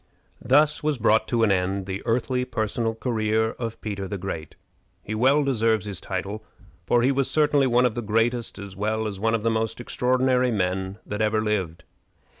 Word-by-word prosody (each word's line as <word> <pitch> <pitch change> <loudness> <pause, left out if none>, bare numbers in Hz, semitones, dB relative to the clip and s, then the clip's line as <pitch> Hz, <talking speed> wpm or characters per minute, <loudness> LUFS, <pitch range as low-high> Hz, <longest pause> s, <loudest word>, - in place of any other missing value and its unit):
Thus 150 +3 +3
was 150 -2 0
brought 110 -1 +3
to 115 -2 +1
an 105 - +4
end 95 +1 0
the 95 0 -4
earthly 125 +2 0
personal 115 -2 -2
career 110 -2 0
of 115 -2 -4
Peter 100 -3 -4
the 100 - -4
Great. 85 -5 -6 0.5
He 110 - -5
well 135 +7 +3
deserves 115 -6 +1
his 100 -5 -6
title, 105 +2 -4 0.4
for 120 -1 +3
he 130 - +4
was 135 -1 0
certainly 145 -1 +3
one 125 0 +3
of 125 - +1
the 120 - -3
greatest 115 +2 0
as 100 -1 -9
well 110 +3 -1
as 100 -3 -4
one 110 +2 +1
of 110 - -3
the 115 - +2
most 110 0 -1
extraordinary 125 +1 +1
men 95 -2 -1
that 105 +1 -4
ever 110 0 +2
lived. 95 -6 -2
110 Hz, 190 wpm, -24 LUFS, 105-125 Hz, 0.5 s, an